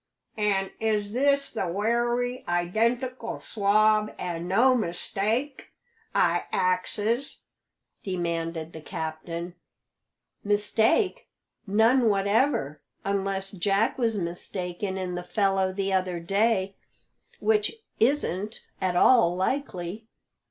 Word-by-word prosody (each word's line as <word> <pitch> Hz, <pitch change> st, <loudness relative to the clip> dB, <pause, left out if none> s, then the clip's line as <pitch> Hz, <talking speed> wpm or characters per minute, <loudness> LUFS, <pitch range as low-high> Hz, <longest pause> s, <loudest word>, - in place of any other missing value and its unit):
"An' 200 Hz, -3 st, 0 dB
is 210 Hz, -2 st, 0 dB
this 280 Hz, +3 st, +2 dB
the 220 Hz, -5 st, -2 dB
wery 240 Hz, +6 st, 0 dB
identical 230 Hz, +9 st, 0 dB
swab, 215 Hz, +1 st, +2 dB
an' 175 Hz, -1 st, -4 dB
no 235 Hz, +8 st, +4 dB
mistake? 225 Hz, +6 st, -2 dB, 0.4 s
I -, -, +2 dB
axes," 205 Hz, +7 st, 0 dB, 0.6 s
demanded 165 Hz, -3 st, -3 dB
the 160 Hz, -, -8 dB
captain. 165 Hz, +1 st, -5 dB, 0.9 s
"Mistake? 215 Hz, -, +2 dB, 0.4 s
None 225 Hz, +4 st, +4 dB
whatever, 200 Hz, -, +1 dB, 0.2 s
unless 195 Hz, -1 st, -1 dB
Jack 200 Hz, +6 st, +1 dB
was 225 Hz, -3 st, +1 dB
mistaken 180 Hz, +2 st, -4 dB
in 185 Hz, -1 st, -3 dB
the 175 Hz, -, -3 dB
fellow 195 Hz, 0 st, +1 dB
the 195 Hz, 0 st, -2 dB
other 185 Hz, -2 st, 0 dB
day, 195 Hz, +2 st, +1 dB, 0.6 s
which 430 Hz, 0 st, +2 dB, 0.2 s
isn't 225 Hz, -, 0 dB, 0.2 s
at 185 Hz, -1 st, 0 dB
all 180 Hz, -3 st, +5 dB
likely. 195 Hz, -2 st, -3 dB
200 Hz, 95 wpm, -26 LUFS, 180-230 Hz, 0.9 s, all